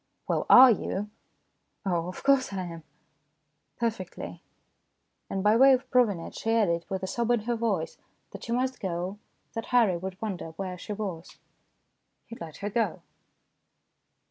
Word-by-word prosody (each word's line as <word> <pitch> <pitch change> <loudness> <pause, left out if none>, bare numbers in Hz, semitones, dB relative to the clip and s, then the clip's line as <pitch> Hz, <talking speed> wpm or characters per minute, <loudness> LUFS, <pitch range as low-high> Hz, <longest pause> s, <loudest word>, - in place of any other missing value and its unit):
"Well, - - 0
are 255 0 +10
you?" 210 -1 -2 0.4
" - - -47
Oh, 175 -3 0
of 185 - -8
course 275 -3 +3
I 190 -1 -2
am. 165 -2 -8 0.9
Perfectly." 220 -6 -4 0.9
And 195 -1 -2
by 210 +1 +5
way 270 +3 +7
of 260 0 0
proving 235 -8 +3
it 165 - -8
she 225 0 -1
added, 170 -7 +1
with 190 0 -3
a - - +1
sob 235 +4 -2
in 240 -2 +3
her 240 +2 -1
voice, 215 -8 -2 0.3
that - - -9
she 235 - -5
must 255 +2 0
go, 185 +1 -3 0.3
that 225 -1 -5
Harry 230 -8 +3
would 185 +1 -6
wonder 185 -7 -5
where 185 +1 -5
she 210 - -5
was. 190 -5 -6 0.9
He 230 - -9
let 165 -7 -9
her - - 0
go. 225 +1 -1
205 Hz, 165 wpm, -28 LUFS, 185-235 Hz, 0.9 s, are